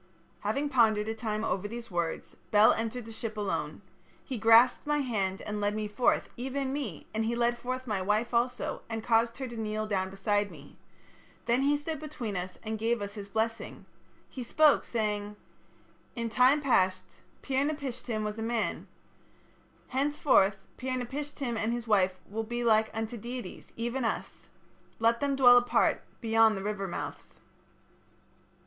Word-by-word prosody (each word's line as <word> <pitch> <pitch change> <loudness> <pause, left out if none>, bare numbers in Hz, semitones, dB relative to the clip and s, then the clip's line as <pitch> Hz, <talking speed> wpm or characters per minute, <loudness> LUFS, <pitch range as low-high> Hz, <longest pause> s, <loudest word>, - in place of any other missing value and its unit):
"Having 275 +8 -1
pondered 220 -5 +3
a 220 - -1
time 220 -1 -3
over 200 -2 -1
these 235 0 -8
words, 170 -2 -3
Bel 210 +1 +6
entered 225 +1 -3
the 225 - -9
ship 220 -1 -5
alone. 205 -2 -3 0.4
He 255 -5 -4
grasped 230 +6 +5
my 295 0 +2
hand 195 -7 -2
and 210 0 -4
led 205 +1 0
me 215 -1 -2
forth, 210 +4 +1
even 265 +2 -3
me, 250 - -4
and 220 +1 0
he 230 +2 0
led 240 0 +2
forth 255 +2 -4
my 210 -5 -1
wife 210 +5 0
also, 240 +2 0
and 225 -1 -4
caused 230 0 +2
her 265 -1 -4
to 235 - -8
kneel 215 -1 -2
down 190 -3 -1
beside 205 +1 0
me. 145 -5 -14 0.7
Then 240 +2 +2
he 290 +2 +3
stood 305 +1 -4
between 255 -9 -5
us 180 0 -4
and 220 -1 -3
gave 230 +2 +1
his 205 -1 -8
blessing. 225 +2 -3 0.4
He 260 - -8
spoke, 300 +5 +4
saying: 210 -2 -2 0.8
'In 230 -1 -2
time 255 +6 +4
past 185 -9 +2 0.4
Pir 270 0 +1
napishtim 255 -7 -3
was 210 +1 -4
a - - -3
man. 225 -1 -2 1.0
Henceforth 265 -7 +3 0.2
Pir 255 0 -2
napishtim 270 0 -4
and 220 +1 0
his 240 -1 -3
wife 190 -4 +3
will 220 +3 -3
be 240 +2 -3
like 220 -1 +4
unto 225 +1 -4
deities, 240 +3 -7
even 240 +3 -2
us. 225 - -3 0.5
Let 230 +1 +3
them 280 -1 0
dwell 245 -2 +8
apart 245 - +1 0.2
beyond 225 -2 +4
the 195 - -5
river 205 -1 -2
mouths.' - - -7
225 Hz, 165 wpm, -29 LUFS, 210-250 Hz, 1.0 s, dwell